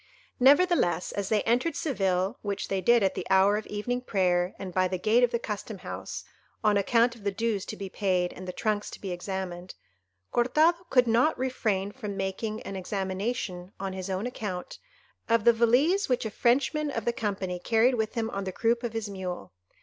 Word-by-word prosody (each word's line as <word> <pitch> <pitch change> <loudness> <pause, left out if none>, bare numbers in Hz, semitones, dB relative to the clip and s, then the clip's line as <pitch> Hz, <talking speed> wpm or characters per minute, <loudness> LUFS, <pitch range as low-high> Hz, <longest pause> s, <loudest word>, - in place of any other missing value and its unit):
Nevertheless, 275 - +4
as 200 -1 -3
they 215 -2 +2
entered 250 +7 +1
Seville—which 195 - -1
they 195 -1 0
did 235 +3 +4
at 190 - +2
the - - -5
hour 190 +2 +5
of 215 - -4
evening 245 +4 -2
prayer, 180 -5 +1
and 185 -2 -7
by 185 0 +2
the 185 0 -2
gate 220 +6 +3
of 245 - +5
the 235 - 0
custom 210 -1 -5
house, - - -6 0.4
on 210 -1 +4
account 230 +4 +3
of 230 -3 -15
the 200 - +1
dues 205 0 -1
to - - -6
be 195 - -5
paid, 185 -2 0
and 185 +1 -9
the - - -2
trunks 210 +2 -1
to - - -10
be 195 - -5
examined—Cortado 185 - -2
could 250 -2 +5
not 240 +7 +3
refrain 215 -7 -1
from 210 -5 -6
making 205 +3 -3
an 195 - -6
examination, 190 0 -3
on 195 -1 -3
his 190 0 -5
own 190 +3 -2
account, 205 -7 -5 0.5
of 230 -1 +3
the 235 - +7
valise 265 - +3
which 250 -2 +1
a 220 - -3
Frenchman 280 +7 +1
of 230 -6 -3
the 235 - +1
company 195 -5 -3
carried 230 +6 +3
with 220 0 -1
him 225 -1 -1
on 200 -4 -3
the 190 - -3
croup 230 +4 +1
of 240 -3 -4
his 225 -1 -3
mule. 180 - -6
210 Hz, 195 wpm, -28 LUFS, 190-235 Hz, 0.5 s, the